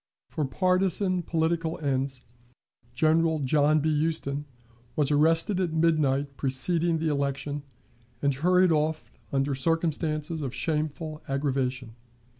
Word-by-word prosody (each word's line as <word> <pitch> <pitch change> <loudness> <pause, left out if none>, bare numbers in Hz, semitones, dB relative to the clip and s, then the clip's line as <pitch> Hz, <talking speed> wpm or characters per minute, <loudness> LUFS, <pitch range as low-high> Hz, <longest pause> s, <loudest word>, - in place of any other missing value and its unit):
For 155 - -1
partisan 185 +4 +1
political 165 0 -1
ends, 135 -3 -1 0.7
General 160 +3 +3
John 150 +2 +2
B. 155 0 +1
Huston 145 -3 -2 0.5
was 150 -1 +1
arrested 165 +6 +3
at 175 -4 -1
midnight 145 -4 +1
preceding 165 +5 +1
the 160 0 -1
election, 140 0 -2 0.6
and 140 +1 +1
hurried 180 +5 +3
off 155 0 0 0.2
under 135 +1 0
circumstances 155 +1 -1
of 135 -4 -4
shameful 155 0 -2
aggravation. 135 -3 -2
155 Hz, 110 wpm, -27 LUFS, 140-165 Hz, 0.7 s, General